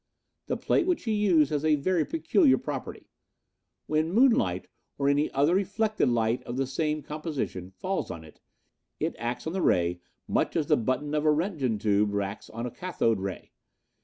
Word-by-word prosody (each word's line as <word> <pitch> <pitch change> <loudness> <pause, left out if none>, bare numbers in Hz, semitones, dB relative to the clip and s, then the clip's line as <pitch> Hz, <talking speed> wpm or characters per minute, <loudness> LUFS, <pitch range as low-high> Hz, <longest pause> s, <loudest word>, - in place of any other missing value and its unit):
The - - -1
plate 365 - +1
which 360 -3 0
he 225 - -1
used 180 -9 +3
has 150 -1 -1
a 155 -1 +4
very 165 +3 +1
peculiar 330 -2 +3
property. - - -6 0.8
When 155 +2 0
moonlight, 195 - +3 0.3
or 140 - 0
any 145 +2 +2
other 145 +5 +2
reflected 205 - +1
light 115 0 +1
of 120 - -6
the 135 - +1
same 150 +3 -2
composition 150 - -4
falls 185 - -3
on 80 - -7
it, 80 - -17 0.6
it - - -1
acts 120 +1 -3
on 160 - -3
the 190 - -1
ray 90 - +2 0.3
much - - 0
as 160 - +1
the - - +4
button 130 +6 -1
of 150 -1 +1
a 155 - +4
Roentgen 150 - 0
tube 105 0 +1
acts 100 +1 -5
on 115 +2 -5
a 125 - -4
cathode 115 - 0
ray. 95 -1 -6
145 Hz, 180 wpm, -27 LUFS, 110-175 Hz, 0.8 s, a